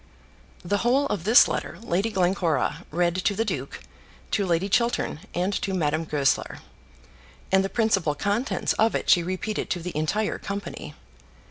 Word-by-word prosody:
The 205 +3 0
whole 255 +5 +2
of 190 -5 -3
this 225 +4 +7
letter - - -4
Lady 205 -1 -1
Glencora 180 -4 0
read 175 +1 +1
to 200 +2 0
the 225 +3 0
duke, 140 - -4 0.5
to 200 - +1
Lady 175 +2 +1
Chiltern, 235 -7 0 0.2
and 180 +3 0
to 195 -2 -2
Madame 155 -1 0
Goesler; 145 -3 0 0.9
and 190 0 +4
the 195 - -2
principal 195 -10 +1
contents 205 - -1
of 225 +1 +3
it - - +1
she 175 - +6
repeated 185 +5 -3
to 180 - -1
the 175 -1 -6
entire 200 +8 -1
company. 200 0 -6
190 Hz, 155 wpm, -25 LUFS, 170-210 Hz, 0.9 s, this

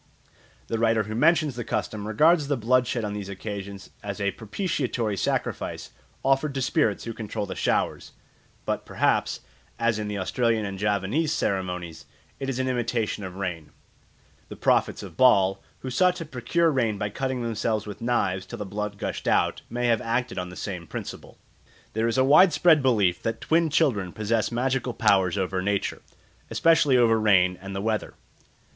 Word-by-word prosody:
The 115 - -2
writer 115 -1 +3
who 110 +1 -6
mentions 150 +3 +3
the 120 - -4
custom 105 -1 -3
regards 150 +7 +4
the 145 -1 0
blood 125 +2 +2
shed 120 -3 -2
on 105 - -3
these 100 -2 -5
occasions 100 0 -7
as 100 0 -5
a 100 -1 0
propitiatory 120 - -2
sacrifice 95 - -2 0.3
offered 135 +1 +2
to 135 - -1
spirits 105 -4 +1
who 115 - -5
control 105 -1 -4
the 95 - -5
showers; - - -1 0.5
but - - -2
perhaps, - - 0 0.4
as 115 -2 +1
in 105 - -3
the 105 -1 -3
Australian 115 +3 0
and 100 -1 -5
Javanese 105 - 0
ceremonies, 90 - -2 0.3
it 135 - -3
is 130 - -2
an 130 0 -1
imitation 115 -4 -1
of 95 -1 -7
rain. 90 -5 -4 0.8
The - - -7
prophets - - +1
of - - -10
Baal, 100 -7 +4 0.2
who 130 - -5
sought 180 +7 +3
to 170 -2 -6
procure 155 +5 +1
rain 115 -7 0
by 105 0 -3
cutting 130 +1 -2
themselves 110 -1 -1
with 105 0 -8
knives 95 -6 0
till 120 - -7
the 105 - -5
blood 105 +1 -4
gushed - - -4
out, - - +2
may 120 +1 -2
have 115 -2 +2
acted 120 -2 -1
on 90 0 -4
the 90 - -10
same 90 -4 -5
principle. - - -8 0.6
There 110 +1 +1
is 115 - 0
a 130 - +5
widespread 155 +2 +6
belief 105 -9 +2
that 115 0 -2
twin 165 0 +2
children 115 - +1
possess 110 +1 0
magical 125 0 -1
powers 100 -3 +3
over 95 -1 -1
nature, 100 +1 -1 0.5
especially 160 -5 +4
over 115 -2 +4
rain 95 -4 +4
and 95 0 -7
the 95 - -2
weather. 110 0 -2
110 Hz, 175 wpm, -25 LUFS, 100-130 Hz, 0.8 s, widespread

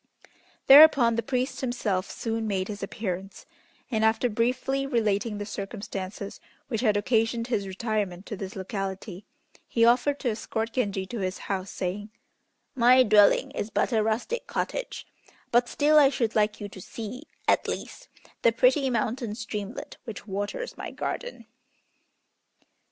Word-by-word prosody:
Thereupon 275 -5 +8
the 230 - 0
priest 255 +3 -2
himself 215 -7 -1
soon 225 -1 -3
made 195 -2 -1
his 205 -1 -6
appearance, 195 -1 -5 0.5
and, 220 -2 +1
after 220 +3 +3
briefly 255 +4 0
relating 215 -4 0
the 205 - -4
circumstances 200 -1 -6 0.3
which 225 -5 -1
had 215 -4 +3
occasioned 225 +2 +1
his 200 -5 -1
retirement 195 -2 -3
to 210 - -5
this 190 0 -7
locality, 195 0 -5 0.4
he 230 -1 +3
offered 250 +4 +3
to 245 - +1
escort 225 +1 -3
Genji 200 -6 -1
to 230 +4 -6
his 185 0 -2
house, 190 -1 -4
saying, 195 +3 -4 0.6
"My 255 0 +6
dwelling 210 -3 +5
is 205 - -4
but - - 0
a 220 - +3
rustic 240 - -2
cottage, - - -3 0.5
but 240 +1 +3
still 305 +1 +4
I 280 -2 +6
should 235 -5 -1
like 210 -1 +1
you 205 - -5
to 190 - -11
see, 235 - -7 0.2
at - - +3
least, - - -6 0.3
the 230 - +5
pretty 255 +4 +3
mountain 230 -1 -1
streamlet 215 -2 -6
which 225 -5 -7
waters 205 - -4
my - - -5
garden." 485 - -5
220 Hz, 145 wpm, -27 LUFS, 200-245 Hz, 0.6 s, Thereupon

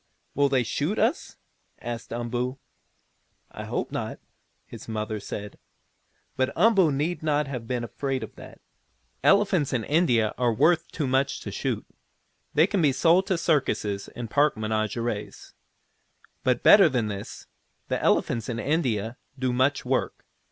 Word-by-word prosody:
"Will 140 0 +2
they 130 -2 +2
shoot 150 - -2
us?" 235 - 0 0.4
asked 120 -1 -6
Umboo. 120 +2 -2 0.9
"I - - -7
hope - - -3
not," - - -4 0.5
his - - -11
mother 110 -1 -3
said. 105 0 -7 0.8
But 130 0 0
Umboo 195 -8 +4
need 150 +6 -1
not 150 -1 +1
have 125 -4 -6
been 125 -1 -2
afraid 135 +2 -3
of - - -9
that. - - -13 0.6
Elephants 195 -8 +3
in 120 -3 0
India 125 -7 +2
are 120 -2 +3
worth 160 +8 +2
too 155 - -2
much 130 +1 +1
to - - -6
shoot. - - -3 0.7
They 155 - +6
can 200 -1 0
be 150 -3 +4
sold 170 +7 +3
to 190 - +1
circuses 130 - 0
and 120 -1 -7
park 145 +3 +2
menageries. 110 0 -3 0.9
But, - - +1
better - - +8
than 120 -4 0
this, 100 -1 -7 0.4
the - - -1
elephants 115 -1 +1
in 115 - -3
India 120 -6 -1 0.2
do 130 -1 -1
much 130 +3 +1
work. - - -1
130 Hz, 145 wpm, -26 LUFS, 115-155 Hz, 0.9 s, better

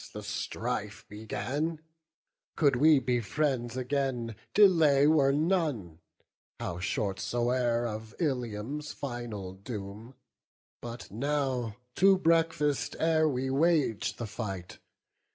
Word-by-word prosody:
the - - -7
strife 100 -1 -4
began: 140 +9 -3 0.8
Could 140 -4 +3
we 150 +4 +6
be 125 -2 +1
friends 125 0 -1
again, 130 -3 -1 0.2
delay 160 -9 +6
were 145 -3 +5
none, 145 - 0 0.6
How 85 0 -4
short 95 +1 -2
soe'er, 120 +3 0
of 110 -1 -6
Ilium's 135 - -2
final 120 -8 -5
doom. 105 +3 -8 0.7
But 120 0 -8
now 130 -2 -1 0.2
to 195 +1 +6
breakfast, 160 -7 +1
ere 160 -1 +3
we 130 -1 -1
wage 150 -6 +2
the 120 - -5
fight. 100 -4 -6
125 Hz, 105 wpm, -29 LUFS, 110-150 Hz, 0.8 s, we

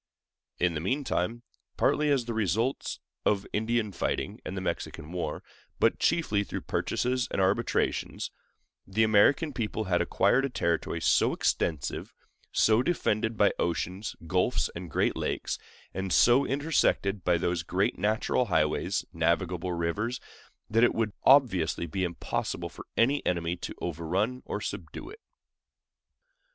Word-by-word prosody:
In 90 -1 +2
the 80 - -2
meantime, 120 - -1 0.3
partly 150 0 +2
as 135 -4 +2
the 120 - -3
results 110 - -1 0.2
of 100 -1 +1
Indian 110 0 0
fighting 90 - -2
and - - -5
the - - -2
Mexican 75 - -4
war, 85 -4 -3 0.4
but - - +3
chiefly 105 -12 +2
through - - -5
purchases 125 0 -1
and - - -2
arbitrations, 100 +5 0 0.6
the 110 +3 +2
American 120 +8 +4
people 110 -2 -2
had 90 -3 +1
acquired 100 +8 +3
a 140 - 0
territory 85 -6 -1
so - - +3
extensive, 80 -5 -1 0.4
so 110 +2 +4
defended 110 -8 0
by 100 - +5
oceans, 90 +4 -2
gulfs, 90 +8 +1
and 85 0 -6
great - - +1
lakes, - - -2 0.3
and 95 0 -3
so 125 +8 +5
intersected 135 - +1
by 90 -1 +3
those 85 0 0
great 90 +4 0
natural 105 +3 +1
highways, - - 0
navigable 85 +2 0
rivers, 95 +9 -1 0.5
that 115 +2 +3
it 120 - +4
would 110 -2 0
obviously 110 - +4
be 95 +3 -3
impossible 85 -2 -3
for - - -12
any 135 +5 +3
enemy 85 -1 0
to 85 - -7
overrun 90 +9 -2
or - - -2
subdue 95 - -6
it. 435 - -12
100 Hz, 140 wpm, -28 LUFS, 90-120 Hz, 0.6 s, by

